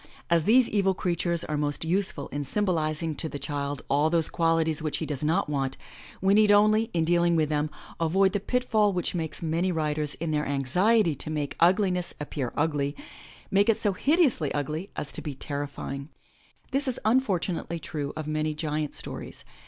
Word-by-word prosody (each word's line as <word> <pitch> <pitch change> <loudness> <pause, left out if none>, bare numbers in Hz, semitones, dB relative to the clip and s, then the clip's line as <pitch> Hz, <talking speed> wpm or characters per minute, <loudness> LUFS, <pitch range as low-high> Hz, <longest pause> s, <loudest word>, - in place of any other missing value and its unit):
As 170 -2 +3
these 240 +4 +5
evil 195 -2 +1
creatures 170 -1 0
are 150 - -2
most 145 +1 -1
useful 175 -4 -1
in 145 - -3
symobliz 155 -1 0
ing 160 -1 -1
to 160 - -3
the 145 - -5
child 140 0 -4
all 145 +3 +2
those 165 -1 +2
qualities 165 -2 +1
which 150 -2 -2
he 160 - -3
does 150 -2 -4
not 165 +6 +1
want, 135 -3 -2 0.4
we 195 +1 +4
need 210 0 +5
only, 215 +2 +4
in 165 -4 +1
dealing 170 0 +3
with 155 -2 +2
them, 150 0 0 0.3
avoid 190 +4 +3
the 205 - +1
pitfall 215 -2 +1
which 180 -1 -1
makes 165 -1 -4
many 165 +3 0
writers, 150 -2 -1
in 165 -1 -3
their 150 -1 0
anxiety 170 - +2
to 140 - -4
make 150 -2 -3
ugliness 180 0 +2
appear 145 -4 -3
ugly, 145 -2 0 0.6
make 200 +3 +4
it 225 - +4
so 205 -2 0
hideously 275 - +2
ugly 155 +6 -3
as 150 - -4
to - - -6
be 145 -3 -5
terrifying. 140 0 -5 0.6
This 275 +1 +1
is 255 - -1
unfortunately 190 -8 +1
true 150 -3 -4
of 155 - -4
many 155 0 -1
giant 150 -1 -2
stories. - - -7
160 Hz, 185 wpm, -27 LUFS, 150-190 Hz, 0.6 s, these